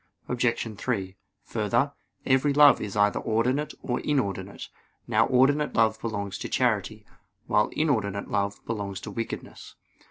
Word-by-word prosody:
Obj. 120 -2 -1
3: 95 -7 -2 0.3
Further, - - 0 0.3
every 135 +2 +3
love 145 -3 +7
is 105 -1 -4
either 105 0 +3
ordinate 125 +7 0
or 125 -1 -1
inordinate. 100 -9 -2 0.4
Now 115 -1 +3
ordinate 145 +4 +3
love 110 -1 +2
belongs 100 -4 -4
to - - -5
charity; - - 0 0.4
while 105 0 +2
inordinate 110 -10 -1
love 100 0 -2
belongs 100 -4 -4
to - - -7
wickedness. 115 -1 -6
115 Hz, 130 wpm, -26 LUFS, 100-130 Hz, 0.4 s, love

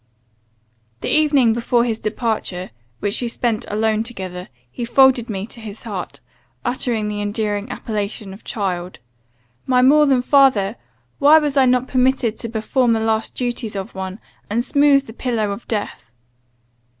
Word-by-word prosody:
"The - - -2
evening 285 -7 +4
before 235 +1 +1
his 230 -2 -1
departure, 215 -5 -3 0.3
which 205 +4 0
we 245 - -1
spent 235 -1 -1
alone 215 +1 0
together, 190 -6 -6 0.2
he 240 - -5
folded 245 0 +4
me 195 -2 -3
to 235 - -10
his 215 -1 -9
heart, 200 -6 -6 0.5
uttering 240 -3 -1
the 210 0 -3
endearing 205 +1 -2
appellation 210 -3 -4
of 195 - -13
'child.' 185 -5 -3 0.7
My 250 -1 +4
more 295 +3 +6
than 260 -3 +3
father! 250 -8 +4 0.4
why 295 +3 +7
was 295 -2 0
I 265 -2 +5
not 250 0 +2
permitted 255 -3 +1
to 230 - -5
perform 230 +2 +1
the 225 - +1
last 220 0 -1
duties 240 -4 -3
of 195 -1 -5
one, 190 +1 -6 0.3
and 230 +3 0
smooth 285 -1 +4
the 225 - -10
pillow 225 -4 -1
of 200 +4 -7
death? 205 - -4
230 Hz, 155 wpm, -20 LUFS, 205-255 Hz, 0.7 s, why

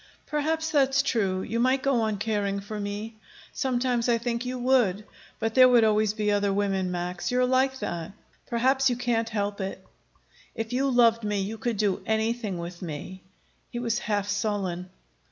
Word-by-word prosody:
"Perhaps 320 +2 -1
that's 275 -1 +3
true. 195 -8 0
You 230 +2 -2
might 260 +2 +2
go 270 -4 +2
on 215 -2 0
caring 205 -1 -1
for 210 +2 -6
me. 205 +2 -5 0.4
Sometimes 245 -2 0
I 235 - +4
think 235 0 -2
you 255 0 -3
would. 240 -6 +2 0.3
But 225 0 -2
there 255 0 +7
would 240 -2 +5
always 215 -1 +2
be 210 -1 0
other 205 -1 +2
women, 195 -2 0
Max. 180 0 -3
You're 250 0 +2
like 260 +1 +2
that. 170 +2 -4 0.3
Perhaps 260 +3 +2
you 245 - 0
can't 235 -2 0
help 205 -2 -2
it." 190 0 -5 0.7
"If 225 +1 -4
you 270 +2 +1
loved 230 -2 +4
me 210 -1 -1
you 215 +3 -4
could 235 -1 -2
do 200 -2 +1
anything 220 -2 0
with 170 +1 -7
me." 180 +3 -6 0.5
He - - -6
was 235 -2 -1
half 205 -2 -1
sullen. 200 -3 -2
220 Hz, 175 wpm, -26 LUFS, 200-245 Hz, 0.7 s, there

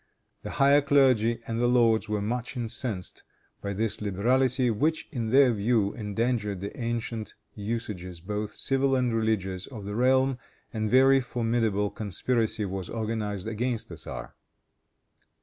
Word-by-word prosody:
The - - -6
higher 140 +1 +6
clergy 130 -5 +3
and 115 +1 -2
the 120 - +3
lords 115 -3 +3
were 105 -1 -1
much 125 +4 -3
incensed 115 -5 -2 0.4
by 100 0 -3
this 110 +2 -1
liberality, 125 +5 +2
which, 155 +9 0
in 115 -5 -2
their 130 0 +5
view, 105 -1 +1
endangered 105 -1 -1
the 100 +6 -6
ancient 115 -3 -4 0.2
usages, 100 -5 -5
both 105 +4 -4
civil 135 0 +1
and 125 -2 +1
religious, 95 -5 -1
of 110 -7 -9
the 105 +1 -4
realm, 130 +1 +3 0.3
and 110 -1 -1
a - - -2
very 135 +2 +6
formidable 115 -4 0
conspiracy 110 +1 -1
was 95 -2 -5
organized 110 -3 -3
against 115 +1 -2
the - - -7
tzar. - - -7
115 Hz, 145 wpm, -27 LUFS, 105-125 Hz, 0.4 s, higher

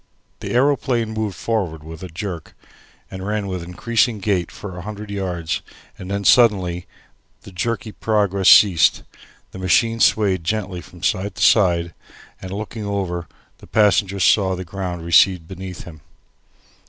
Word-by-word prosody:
The - - -5
aeroplane 125 -3 +1
moved 110 -3 -3
forward 90 -10 -2
with 80 0 -10
a 95 - -6
jerk, 85 -1 -7 0.6
ran 100 +2 -3
with 95 -2 -4
increasing 110 +6 0
gait 95 -4 -1
for 95 -3 -9
a 90 - -7
hundred 105 +1 -8
yards, 90 -4 -3 0.3
and 90 - -9
then 100 0 -2
suddenly 95 -6 +3 0.6
the - - -12
jerky 115 +5 -3
progress 100 -3 +1
ceased. 90 -6 +6 0.5
The 95 - -9
machine 115 +5 +2
swayed 100 -6 +2
gently 95 -1 -3
from 90 0 -16
side 100 0 -1
to - - -2
side, 85 -5 +3 0.5
and 95 - -7
looking 105 +2 -5
over, 95 -4 -3 0.3
the - - -15
passenger 100 -2 +2
saw 95 0 +3
the 90 0 -6
ground 90 -1 -5
recede 85 0 +4
beneath 95 -1 -8
him. 80 -4 -12
95 Hz, 145 wpm, -20 LUFS, 90-105 Hz, 0.6 s, ceased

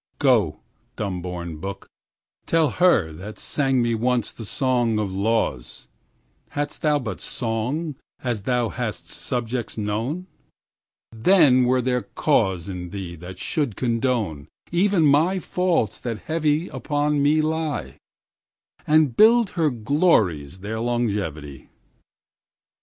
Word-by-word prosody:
1Go, - - +3 0.4
dumb 95 -4 -3
born 85 -2 -5
book,2Tell 100 - -4
her 175 - +4
that 95 +7 -9
sang 135 -4 +1
me 120 0 +1
once 120 0 0
that 115 - -9
song 120 -1 +1
of 100 -3 -2
Lawes:3Hadst 110 - -4
thou 150 -1 +3
but 120 -6 -5
song4As 120 -1 -3
thou 125 -3 +1
hast 85 - -4
subjects 120 -1 -3
known,5Then 125 - 0
were 125 0 +2
there 125 0 +1
cause 95 - 0
in 90 -2 -6
thee 90 -3 -6
that 90 +2 -9
should 140 - -2
condone6Even 125 - 0
my 155 +6 +4
faults 180 - 0
that 115 -3 -4
heavy 155 +4 0
upon 145 -1 0
me 145 +2 +4
lie7And 155 -2 -2
build 225 -1 +5
her 165 -4 +1
glories 110 - +1
their 110 +3 -4
longevity. 100 - -2
120 Hz, 105 wpm, -23 LUFS, 100-150 Hz, 0.4 s, build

